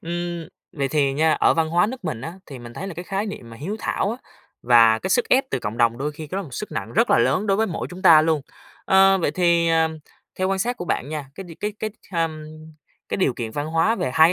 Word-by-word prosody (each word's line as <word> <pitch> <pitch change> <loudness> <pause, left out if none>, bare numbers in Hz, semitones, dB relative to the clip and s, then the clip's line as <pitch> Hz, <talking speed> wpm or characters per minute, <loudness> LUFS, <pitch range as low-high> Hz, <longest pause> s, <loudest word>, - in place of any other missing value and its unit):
Ưm, 175 0 -4 0.2
vậy 140 -5 -2
thì 140 -1 +1
nha, 155 +3 +2
ở - - +3
văn 160 -1 +1
hóa 175 +4 +3
nước 245 -3 -7
mình 140 -9 -3
á, 165 +7 -6
thì 135 -3 -9
mình 120 0 -11
thấy 195 - -6
là 195 - -6
cái 175 +3 -7
khái 195 +3 -2
niệm 160 - -8
mà 115 - -10
hiếu 185 - -4
thảo 200 - -1
á, 235 - -4 0.5
và 115 -2 +6
cái 190 - -4
sức 245 - +2
ép 265 +2 +4
từ - - 0
cộng 105 -1 -5
đồng 115 0 +2
đôi 150 +2 -2
khi 155 +1 -8
cái 185 - -5
đó 195 - -3
một 135 -8 -10
sức 210 - -6
nặng - - -4
rất 230 +2 +2
là - - +5
lớn 200 +3 +2
đối 195 -1 +2
với 220 +1 +1
mỗi 170 - -4
chúng 185 +2 -9
ta 160 -4 +8
luôn. 160 -2 +1 0.4
Ơ, 195 0 +5
vậy 160 - 0
thì, 170 -1 +2
à, 160 0 +3 0.5
theo 185 0 +1
quan 195 0 0
sát 240 +5 -1
của 175 - -5
bạn 145 -4 -2
nha, 150 -3 -5
cái 195 - -8
đ 175 - -13
cái 210 0 -2
cái, 215 - -3 0.2
hừm, 160 -2 -2 0.6
cái - - -2
điều 185 -9 +2
kiện 115 -2 -5
văn 145 +5 -3
hóa 165 +8 +2
về 130 - -2
hai 160 +1 +7
165 Hz, 275 wpm, -22 LUFS, 145-190 Hz, 0.6 s, ta